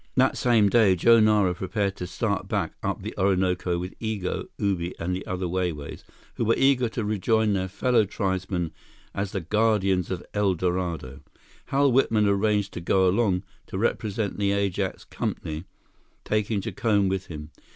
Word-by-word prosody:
That 130 +1 +3
same 115 -4 +3
day, 100 -3 +4
Joe 115 +6 +5
Nara 105 -4 +4
prepared 100 +2 -2
to 90 - -5
start 100 +1 -2
back - - -1
up - - -3
the - - -5
Orinoco 90 -2 +1
with 90 +2 -5
Igo, 110 -5 -3
Ubi, 95 -3 -1
and 90 +2 -2
the 95 - -5
other 90 0 -2
Wai 90 0 0
Wais, 75 -2 -8 0.3
who 115 - 0
were 115 - +3
eager 130 -3 +3
to 110 -1 -3
rejoin 110 +1 +1
their 95 -1 -1
fellow 115 +4 +2
tribesmen 95 -4 -2 0.4
as 100 0 -3
the 95 - -3
guardians 100 -1 +1
of 90 -2 -4
El 100 -3 +2
Dorado. 85 -6 -2 0.5
Hal 140 0 +3
Whitman 115 -4 +3
arranged 100 0 +1
to - - -5
go 95 +2 +3
along 95 -1 +2 0.2
to - - -5
represent 105 -1 -1
the 100 -1 +2
Ajax 100 -1 -1
Company, 80 +3 -4 0.6
taking 105 -1 0
Jacome 105 -1 +1
with 95 0 -2
him. 75 -1 -8
100 Hz, 165 wpm, -25 LUFS, 90-110 Hz, 0.6 s, Joe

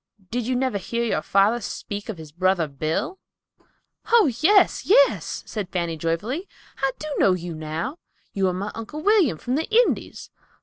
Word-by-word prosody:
Did 240 0 -2
you 255 - 0
never 255 -5 0
hear 235 +5 -2
your 235 - 0
father 205 +5 +2
speak 205 +1 -6
of 215 - -4
his 155 -2 -10
brother 180 0 +1
Bill?" 155 - -3 0.9
"Oh, 450 - +6
yes, 390 +3 +4
yes," - - +3
said 205 -5 -5
Fanny 170 -3 -2
joyfully. 200 - -2 0.3
"I 270 0 +1
do 305 - -6
know 190 - +5
you 175 -1 -4
now. 160 - -4 0.3
You 195 -2 +1
are 180 - 0
my 200 +3 -4
Uncle 265 +7 -7
William 390 - +4
from 245 - -4
the 315 +7 -1
Indies. 465 +2 +1
220 Hz, 170 wpm, -24 LUFS, -, 0.9 s, Oh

